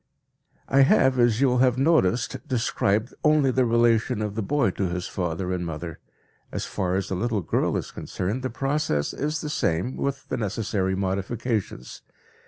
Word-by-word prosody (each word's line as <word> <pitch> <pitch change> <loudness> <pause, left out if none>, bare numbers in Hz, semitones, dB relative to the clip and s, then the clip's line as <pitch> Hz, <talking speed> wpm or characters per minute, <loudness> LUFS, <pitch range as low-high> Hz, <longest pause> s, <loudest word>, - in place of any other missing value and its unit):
I 135 - +4
have, 130 -1 +4
as 120 0 +3
you 140 - +5
will 125 - +2
have 125 -1 +3
noticed, 135 - +1
described 115 -3 0
only 150 -3 +4
the 130 0 +2
relation 115 -2 +2
of 105 -1 -3
the 110 - -2
boy 135 -1 +1
to 95 +1 -2
his 90 +1 -3
father 90 0 -2
and 90 -1 -2
mother. 85 0 -6 0.5
As - - -3
far 90 -1 -2
as 95 0 -2
the 95 - -1
little 110 +1 -1
girl - - 0
is - - -5
concerned, 100 +8 -3
the 130 - -2
process 135 - -1
is 150 +2 -2
the 150 - -4
same 90 - 0
with 140 -1 -3
the - - -1
necessary 100 -3 -1
modifications. 100 - -3
115 Hz, 175 wpm, -25 LUFS, 95-130 Hz, 0.5 s, you